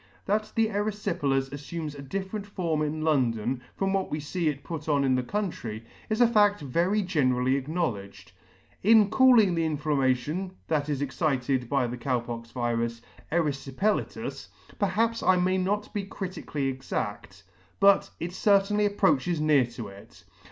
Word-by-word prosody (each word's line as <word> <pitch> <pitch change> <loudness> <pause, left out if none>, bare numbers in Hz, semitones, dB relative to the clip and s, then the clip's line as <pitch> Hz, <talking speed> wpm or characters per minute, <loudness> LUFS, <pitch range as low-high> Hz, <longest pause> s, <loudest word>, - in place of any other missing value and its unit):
That 215 +1 0
the 225 - +4
eryfi 205 -3 -2
pelas 135 -1 0
affumes 150 +1 -5
a 140 - -8
different 195 +8 -5
form 170 -6 -1
in 155 +1 -2
London 125 -5 +1
from 195 0 0
what 195 -1 0
we 150 - -2
fee 160 +3 -2
it 140 -2 -5
put 160 -2 -6
on 145 -2 +3
in 135 -1 +2
the 130 - +2
country, 125 - -4 0.2
is 215 +1 0
a 240 - +7
fadt 205 -3 +4
very 170 +9 +1
generally 130 -7 +1
acknowledged. 110 - -3 0.5
In 215 0 +5
calling 240 -7 +6
the 165 -1 0
inflammation, 150 +3 0 0.2
that 150 -2 0
is 145 -1 -1
excited 130 -3 -1
by 140 -3 +2
the 120 +1 -4
Cow 125 +1 0
pox 115 0 -7
virus, 115 -1 -2 0.3
eryfipelatous, 155 +4 -1 0.3
perhaps 225 +4 +1
I 185 - +4
may 185 +1 +2
not 205 +3 -1
be 205 - -2
critically 185 -7 -4
exadt, 105 -7 -5 0.4
but 200 0 +5
it 175 +2 -4
certainly 205 +1 +3
approaches 180 -5 +1
near 150 -5 +4
to 120 -3 -8
it. 100 0 -15
155 Hz, 155 wpm, -27 LUFS, 130-195 Hz, 0.5 s, a